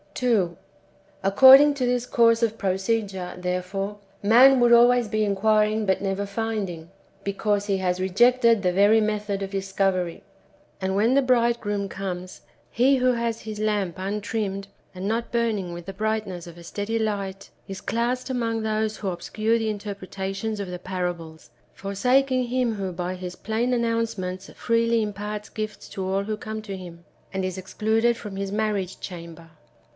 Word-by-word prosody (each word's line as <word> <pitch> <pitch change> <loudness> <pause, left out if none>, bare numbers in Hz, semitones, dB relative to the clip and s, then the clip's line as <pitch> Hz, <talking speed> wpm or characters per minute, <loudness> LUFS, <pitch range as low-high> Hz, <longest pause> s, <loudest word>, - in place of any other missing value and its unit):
2. 210 -9 +1 0.7
According 265 +9 +8
to 260 -3 -1
this 245 0 0
course 230 -2 +3
of 225 -1 +1
procedure, 195 -1 -1
therefore, 180 +3 -3 0.2
man 250 +6 +7
would 240 -1 +4
always 240 0 +6
be 215 +1 0
inquiring 215 +1 +2
but 190 -1 +1
never 195 0 -1
finding, 200 -6 -4 0.3
because 205 +1 -1
he 195 -1 +1
has 180 -1 -1
rejected 230 +4 +4
the 180 -2 +1
very 205 +4 +5
method 210 -2 -1
of 195 0 -4
discovery. 195 -2 -1 0.6
And 190 0 -1
when 220 +5 +3
the 275 - +5
Bride 240 -2 +2
groom^ 205 -2 -2
comes, 185 -2 -6 0.3
he 265 +3 +4
who 255 0 +3
has 235 -1 -2
his 215 -1 -7
lamp 205 -5 0
untrimmed, 200 0 -3 0.3
and 185 +1 -5
not 230 +2 -2
burning 225 -6 0
with 170 0 -8
the 195 - -6
brightness 215 -4 -2
of 170 0 -11
a 170 - -12
steady 205 +6 -3
light, 195 -3 -3 0.2
is 195 0 -7
classed 245 +3 -1
among 230 -3 -1
those 215 0 -1
wdio 195 -3 -2
obscure 215 +6 0
the 220 -1 -1
interpretations 200 0 -4
of 200 - -4
the 180 0 -6
parables, 175 -3 -5 0.2
forsaking 255 +6 +1
Him 245 -2 0
who 195 -2 -3
by 180 +1 -4
His 180 -1 -7
plain 225 +3 -1
announcements 225 -6 -2
freely 230 0 +1
im 210 -1 -3
parts 210 +1 -5
gifts 215 -1 -6
to 190 - -4
all 195 +1 0
who 215 +1 -3
come 220 0 -6
to 200 -2 -6
Him, 170 -2 -11 0.3
and 190 -1 -1
is 185 0 -4
excluded 220 +5 +1
from 205 -3 -8
His 195 0 -3
marriage 205 -3 -1
chamber. 170 -2 -9
205 Hz, 165 wpm, -24 LUFS, 190-230 Hz, 0.7 s, According